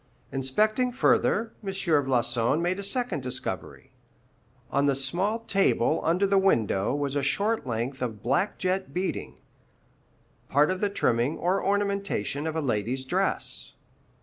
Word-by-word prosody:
Inspecting 215 - +1
further, 230 -2 +2
M. 195 - -4
Floçon 135 -8 +1
made 180 +3 -1
a - - -4
second 245 - 0
discovery. 125 0 -5 0.8
On 140 +1 +2
the 140 - +2
small 180 - +1
table 195 - +2
under 175 +5 +2
the 195 0 +3
window 115 - +2
was 145 -1 -2
a 145 - +1
short 200 +7 0
length 120 +3 -3
of 110 -4 -4
black 140 - 0
jet 190 0 -2
beading, 185 +1 -3 1.1
part 145 +5 +3
of 185 - -3
the 205 - +2
trimming 120 - 0
or 185 +3 0
ornamentation 200 - -1
of 160 - -3
a 160 - 0
lady's 125 0 -1
dress. - - -1
155 Hz, 140 wpm, -27 LUFS, 130-195 Hz, 1.1 s, the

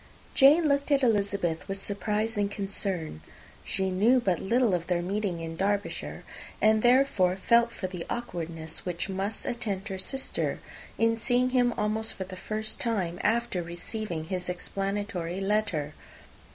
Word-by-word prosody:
Jane 300 +4 +6
looked 280 0 +1
at 280 -2 +3
Elizabeth 200 -8 +1
with 195 0 -2
surprise 210 +3 -1
and 205 -1 +1
concern. 195 - -3 0.4
She 190 -1 0
knew 225 +8 +4
but 190 -8 +1
little 235 +1 +2
of 175 -1 -1
their 175 -1 +1
meeting 190 -2 -2
in 165 0 -5
Derbyshire, 200 +3 -2 0.4
and 215 0 +4
therefore 240 -7 +4
felt 235 +4 +4
for 195 - -5
the 180 -2 -4
awkwardness 165 -8 -4
which 180 +1 -2
must 195 +3 -3
attend 220 -4 -2
her 190 -1 -4
sister, 265 +7 -2 0.4
in 230 0 +3
seeing 250 +2 +2
him 245 -1 +3
almost 220 +1 -1
for 190 - -4
the 185 0 -8
first 215 +3 -4
time 185 -7 -1
after 225 -3 +1
receiving 175 +1 -4
his 180 +2 -4
explanatory 195 -1 -3
letter. 195 -7 0
200 Hz, 150 wpm, -28 LUFS, 180-225 Hz, 0.4 s, Jane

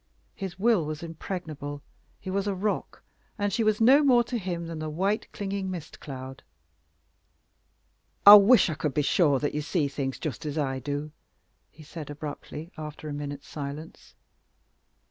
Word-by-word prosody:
His 190 -3 -6
will 215 -3 +3
was 155 +1 -5
impregnable. 155 -4 -6 0.4
He 190 - -6
was 200 +1 -1
a 200 - 0
rock, 205 +3 -3 0.3
and 205 -2 -1
she 230 - +1
was 215 -1 +2
no 260 +6 +7
more 250 -4 +5
to 240 0 -3
him 175 -3 -4
than 165 -1 -6
the 155 0 -3
white 195 +7 -1
clinging 195 -1 -3
mist 175 -4 -7
cloud. 130 -1 -8 1.8
"I 205 - +13
wish 210 +2 +8
I - - -1
could 150 -2 -3
be 150 - +2
sure 145 -2 +3
that 145 +2 -2
you 150 - -1
see 150 0 0
things 135 -1 -3
just 150 -8 -5
as 150 0 -4
I 135 -3 -1
do," 145 +3 -4 0.6
he 155 - -15
said 155 0 -8
abruptly, 150 +2 -7
after 150 0 -7
a - - -4
minute's 145 -1 -6
silence. 145 +2 -8
160 Hz, 165 wpm, -27 LUFS, 145-195 Hz, 1.8 s, I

